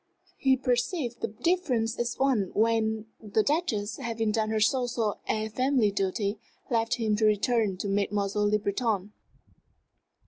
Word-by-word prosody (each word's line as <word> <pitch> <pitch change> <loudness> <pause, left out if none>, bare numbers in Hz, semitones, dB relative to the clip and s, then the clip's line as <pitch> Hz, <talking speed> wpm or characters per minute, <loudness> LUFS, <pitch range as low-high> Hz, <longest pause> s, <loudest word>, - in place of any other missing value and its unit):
He 265 -3 +3
perceived 245 0 -1
the - - 0
difference 250 - 0
at 240 0 -2
once 255 -9 +2
when 220 0 +1 0.2
the 215 0 +1
Duchess, 230 -9 -1
having 225 -4 -1
done 215 0 0
her 220 0 0
social 235 -2 +1
and 215 0 -1
family 255 -4 +2
duty, 200 +2 -1 0.3
left 230 -1 +1
him 220 -3 0
to 215 - +2
return 215 -1 +2
to 200 - -3
Mademoiselle 205 +1 0
Le 210 - +3
Breton. 210 -1 -1
220 Hz, 140 wpm, -28 LUFS, 210-245 Hz, 0.3 s, He